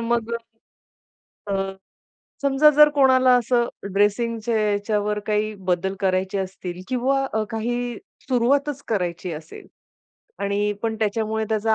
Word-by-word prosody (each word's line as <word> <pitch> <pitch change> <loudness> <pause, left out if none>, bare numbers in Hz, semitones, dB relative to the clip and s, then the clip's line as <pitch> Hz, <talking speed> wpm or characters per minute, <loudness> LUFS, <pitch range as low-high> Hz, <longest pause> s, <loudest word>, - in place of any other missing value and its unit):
मग 235 0 -1
अ, - - +1 1.2
अ, 195 0 -1 0.7
समजा 280 +2 +5
जर 300 0 +9
कोणाला 260 -2 +5
असं 240 0 +1 0.3
ड्रेसिंगच्या 225 +3 +1
याच्यावर 210 0 0
काही 215 0 0
बदल 185 +2 +1
करायचे 190 +1 0
असतील 185 -1 -5
किंवा 265 +2 +1
अ, 220 - +1
काही 240 +1 -2 0.3
सुरुवातच 275 +3 +1
करायची 180 -4 -2
असेल 155 0 -9 0.8
आणि 205 +1 0
पण 225 -1 0
त्याच्यामुळे 220 +1 0
त्याचा 220 0 +1
220 Hz, 120 wpm, -23 LUFS, 200-245 Hz, 1.2 s, जर